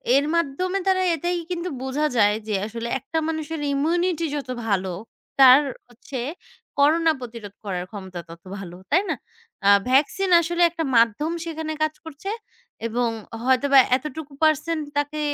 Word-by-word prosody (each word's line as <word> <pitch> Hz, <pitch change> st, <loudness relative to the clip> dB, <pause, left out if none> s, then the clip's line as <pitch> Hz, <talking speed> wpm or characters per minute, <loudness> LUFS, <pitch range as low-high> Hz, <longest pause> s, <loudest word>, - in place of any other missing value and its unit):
এর 280 Hz, +1 st, +3 dB
মাধ্যমে 335 Hz, +4 st, 0 dB
তারা 375 Hz, -1 st, +3 dB
এটাই 350 Hz, +3 st, -1 dB
কিন্তু 350 Hz, 0 st, -2 dB
বুঝা 270 Hz, +3 st, -1 dB
যায় 210 Hz, -1 st, +4 dB
যে 215 Hz, -, -2 dB
আসলে 230 Hz, +2 st, -5 dB
একটা 320 Hz, +6 st, -5 dB
মানুষের 320 Hz, 0 st, -3 dB
ইমিউনিটি 335 Hz, +3 st, +1 dB
যত 275 Hz, -3 st, -5 dB, 0.2 s
ভালো 190 Hz, -2 st, 0 dB, 0.5 s
তার 265 Hz, +1 st, +9 dB, 0.3 s
হচ্ছে 255 Hz, +3 st, -9 dB, 0.6 s
করোনা 320 Hz, +3 st, +4 dB
প্রতিরোধ 230 Hz, -5 st, -8 dB
করার 180 Hz, -3 st, -3 dB
ক্ষমতা 190 Hz, -3 st, -7 dB
তত 165 Hz, 0 st, -11 dB, 0.2 s
ভালো, 180 Hz, -3 st, -8 dB, 0.2 s
তাই 340 Hz, +6 st, +5 dB
না? -, -, +1 dB, 0.5 s
আ -, -, +7 dB, 0.2 s
ভ্যাকসিন 280 Hz, +8 st, +2 dB
আসলে 345 Hz, +1 st, -2 dB
একটা 330 Hz, 0 st, -3 dB
মাধ্যম 230 Hz, +8 st, +3 dB
সেখানে 315 Hz, -1 st, -4 dB
কাজ 310 Hz, 0 st, 0 dB
করছে। 320 Hz, +5 st, -7 dB, 0.6 s
এবং 235 Hz, +1 st, 0 dB, 0.4 s
হয়তোবা 270 Hz, +2 st, +5 dB, 0.2 s
এতটুকু 300 Hz, +1 st, -8 dB
পারসেন 310 Hz, +2 st, +2 dB, 0.2 s
তাকে 290 Hz, +1 st, -1 dB
285 Hz, 145 wpm, -23 LUFS, 235-325 Hz, 0.6 s, তার